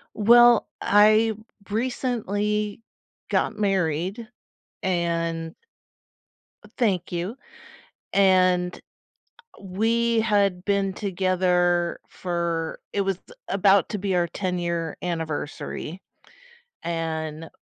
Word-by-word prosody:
Well, 240 +2 +6
I 215 +2 +5 0.4
recently 210 -3 -1 0.5
got - - 0
married, 195 +1 -1 0.6
and 170 -2 -1 1.1
Oh, - - -16
thank 195 -9 0
you. 180 +6 -3 0.8
And 185 -2 +3 0.8
we 225 +4 +1
had 200 -5 +1
been 200 -1 +1
together 180 -2 +1
for 170 -2 -3
it 200 - 0
was 195 -2 -1 0.3
about 195 -1 +4
to 210 - -2
be 195 -1 -1
our 175 -1 +1
ten-year 170 -3 -3
anniversary. 160 +1 -4 0.8
And 160 -1 -3
185 Hz, 80 wpm, -24 LUFS, 170-210 Hz, 1.1 s, Well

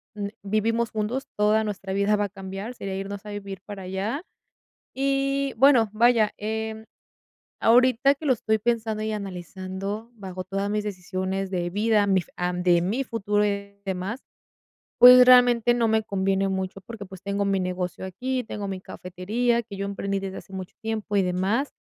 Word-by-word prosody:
mm, 205 -1 -3 0.2
vivimos 225 +3 0
juntos, 220 +5 -2
toda 210 +1 +3
nuestra 195 -2 -4
vida 200 +2 +2
va 205 0 +1
a - - -5
cambiar, 195 +3 -7
sería 195 -5 -5
irnos 195 +1 -6
a - - -7
vivir 200 -2 -6
para 200 -2 -7
allá. 195 - -3 0.7
Y, 275 0 0
bueno, 250 -4 +5
vaya, 230 -1 +4
em, 220 +1 -4 0.7
ahorita 255 +3 +4
que 305 - -10
lo 270 - +4
estoy 220 -2 0
pensando 225 -1 -1
y 220 - -2
analizando, 195 +2 -5
bajo 190 -4 -7
todas 195 +2 -2
mis 210 0 -1
decisiones 190 -1 -3
de 175 -2 -2
vida, 210 +2 +2
mi 190 -2 +3
fu - - -17
am, 180 0 -2
de 175 -1 +4
mi 215 +10 0
futuro 210 -4 0
y 200 0 -4
demás, 195 +6 -3 0.8
pues, 250 0 +10
realmente 245 -2 +6
no 235 -1 +2
me 220 0 +2
conviene 195 -1 0
mucho 190 0 -3
porque, 210 +1 -9
pues, 190 -1 -12
tengo 200 +1 -1
mi 195 -1 +1
negocio 180 0 -3
aquí, 250 +8 -3
tengo 205 -2 -5
mi 190 -1 -5
cafetería, 215 +8 -1
que 215 -3 -9
yo 200 - -2
emprendí 200 0 -2
desde 195 0 -5
hace 195 - -12
mucho 190 0 -7
tiempo 220 -1 -3
y 200 - +5
demás. 190 +9 0
205 Hz, 175 wpm, -25 LUFS, 190-230 Hz, 0.8 s, pues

